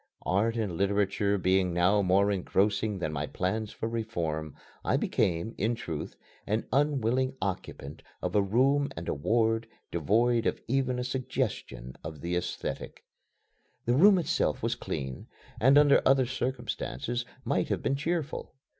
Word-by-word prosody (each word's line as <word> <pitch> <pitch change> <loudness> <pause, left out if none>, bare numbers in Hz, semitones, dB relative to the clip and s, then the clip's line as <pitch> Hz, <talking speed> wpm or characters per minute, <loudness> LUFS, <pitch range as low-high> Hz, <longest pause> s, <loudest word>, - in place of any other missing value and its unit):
Art 105 +7 +1
and 100 -7 -2
literature 100 0 +1
being 95 -1 +2
now 95 +4 +4
more 100 +2 +3
engrossing 100 +2 +1
than 80 -4 -3
my 75 0 -2
plans 105 +4 -2
for 110 - -4
reform, 85 -10 -3 0.3
I - - +2
became, 85 +5 0
in 115 +4 +1
truth, 80 -8 -5 0.3
an 110 +2 0
unwilling 130 -2 +1
occupant 80 -6 -5 0.2
of - - -3
a 105 - +5
room 135 +8 +2
and 85 - -6
a - - 0
ward 115 +8 +1 0.2
devoid 115 +8 +2
of - - -1
even 130 0 +1
a 125 - -1
suggestion 125 - -3
of 75 -3 -7
the 85 +1 -2
aesthetic. 90 - -4 0.8
The 120 - +2
room 190 +9 +7
itself 170 - 0
was - - +1
clean, 65 -1 -5 0.3
and 135 +5 +6
under 145 -1 +6
other 135 -1 +4
circumstances 125 0 -3 0.2
might - - 0
have - - -1
been 135 - +1
cheerful. 160 +1 -3
110 Hz, 145 wpm, -29 LUFS, 90-125 Hz, 0.8 s, room